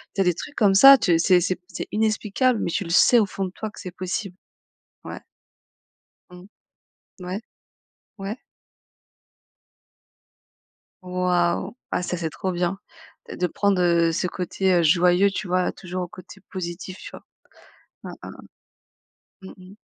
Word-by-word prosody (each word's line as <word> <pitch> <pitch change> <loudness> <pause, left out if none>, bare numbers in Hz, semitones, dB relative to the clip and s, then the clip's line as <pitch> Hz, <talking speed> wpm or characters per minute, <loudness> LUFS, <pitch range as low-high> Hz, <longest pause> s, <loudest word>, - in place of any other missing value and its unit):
tu 195 - +1
as - - +4
des 180 -1 +2
trucs 290 - -9
comme 200 -3 +3
ça, 275 +6 +10
tu 170 -8 +2
c'est 180 0 +4
c'est 185 +1 0
p 180 - -47
c'est - - -6
inexplicable, 220 +2 +1
mais 170 - -2
tu 200 - -1
le 170 - -9
sais 235 +7 +5
au 215 - +3
fond 195 0 -4
de 180 - -6
toi 215 +2 -6
que - - -14
c'est 185 - -7
possible. 185 0 -4 0.7
Ouais. - - -7 1.1
Mmh. 180 +1 -13 0.8
Ouais. 185 +3 -4 0.8
Ouais. 195 +3 -5 2.7
Waouh, 180 +2 0 0.2
ah, - - 0
ça 180 -1 -3
c'est 165 -1 -2
trop 185 +4 -4
bien 175 +2 -1 0.5
de - - -7
de 180 - 0
prendre, 195 +1 0
heu, 170 -1 +3
ce 180 - -1
côté, 185 +2 -1
heu, 175 - +3
joyeux, 180 +4 +4
tu 200 - -5
vois? 180 0 +1
Toujours 185 0 -6
au 175 - -5
côté 185 0 -13
positif, 185 0 -6
tu - - -10
vois? - - -12 0.8
Hein, - - -8
hein, - - -7
hein, - - -12 1.0
mmh 190 - -10
mh. 185 +1 -15
185 Hz, 165 wpm, -23 LUFS, 175-195 Hz, 2.7 s, ça